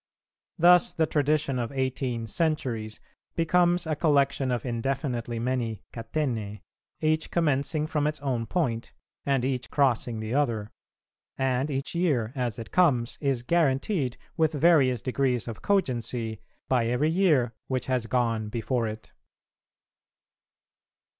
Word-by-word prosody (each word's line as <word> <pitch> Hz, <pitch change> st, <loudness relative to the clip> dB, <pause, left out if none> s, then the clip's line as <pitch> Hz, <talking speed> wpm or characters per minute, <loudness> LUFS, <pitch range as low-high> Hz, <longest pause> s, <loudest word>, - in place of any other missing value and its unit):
Thus 175 Hz, +1 st, +6 dB
the 160 Hz, -, +2 dB
tradition 145 Hz, -3 st, +1 dB
of 115 Hz, -1 st, -3 dB
eighteen 130 Hz, -3 st, -2 dB
centuries 115 Hz, -6 st, -2 dB, 0.4 s
becomes 175 Hz, +1 st, +2 dB
a 155 Hz, -1 st, -1 dB
collection 140 Hz, -3 st, +2 dB
of 125 Hz, -1 st, -1 dB
indefinitely 120 Hz, -1 st, -2 dB
many 115 Hz, -3 st, -2 dB
catenæ, 115 Hz, -4 st, -3 dB, 0.4 s
each 155 Hz, 0 st, +1 dB
commencing 150 Hz, -1 st, +1 dB
from 150 Hz, -2 st, 0 dB
its 155 Hz, 0 st, -2 dB
own 125 Hz, -5 st, -1 dB
point, 125 Hz, -11 st, -1 dB, 0.3 s
and 135 Hz, -3 st, +2 dB
each 130 Hz, -2 st, -2 dB
crossing 125 Hz, -5 st, +1 dB
the 110 Hz, +2 st, -4 dB
other; 115 Hz, -7 st, 0 dB, 0.7 s
and 135 Hz, +1 st, 0 dB
each 135 Hz, -1 st, -3 dB
year, 145 Hz, -11 st, +1 dB
as 125 Hz, -5 st, -2 dB
it 115 Hz, -, -8 dB
comes, 135 Hz, -10 st, +2 dB
is 135 Hz, -4 st, 0 dB
guaranteed 140 Hz, -, +1 dB, 0.2 s
with 160 Hz, -1 st, +2 dB
various 140 Hz, -6 st, +4 dB
degrees 130 Hz, -2 st, 0 dB
of 115 Hz, -, -6 dB
cogency 120 Hz, -, -1 dB, 0.3 s
by 125 Hz, -3 st, +2 dB
every 130 Hz, +7 st, +1 dB
year 155 Hz, -10 st, +3 dB
which 130 Hz, -1 st, -2 dB
has 125 Hz, -3 st, -1 dB
gone 115 Hz, -3 st, 0 dB
before 115 Hz, +1 st, -1 dB
it. 110 Hz, 0 st, -8 dB
130 Hz, 125 wpm, -27 LUFS, 115-150 Hz, 0.7 s, Thus